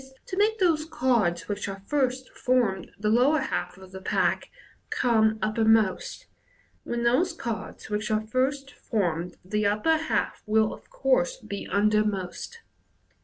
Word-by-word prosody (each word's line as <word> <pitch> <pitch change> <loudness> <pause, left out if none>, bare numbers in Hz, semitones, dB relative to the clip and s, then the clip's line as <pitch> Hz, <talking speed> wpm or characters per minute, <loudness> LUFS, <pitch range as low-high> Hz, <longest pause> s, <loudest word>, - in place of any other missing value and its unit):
to 370 - -5
make 425 +3 +2
those 335 -6 +2
cards 240 - +1
which 205 -1 -3
at 195 0 -8
first 260 -3 0
formed 235 -8 0
the 210 +2 -2
lower 255 +7 +4
half 180 -8 -3
of 190 -1 -14
the 190 0 -8
pack, 185 - 0 0.4
come 220 -3 +2
uppermost, 220 -2 +2 0.6
when 235 0 -3
those 300 +10 +2
cards 235 -9 -5
which 210 0 -2
at 215 0 0
first 270 +4 0
formed 180 -8 -2
the 210 +3 -1
upper 215 +11 +2
half 315 0 -1
will 220 0 +3
of - - -14
course - - +1
be 200 - -7
undermost. 210 - 0
220 Hz, 140 wpm, -26 LUFS, 205-280 Hz, 0.6 s, lower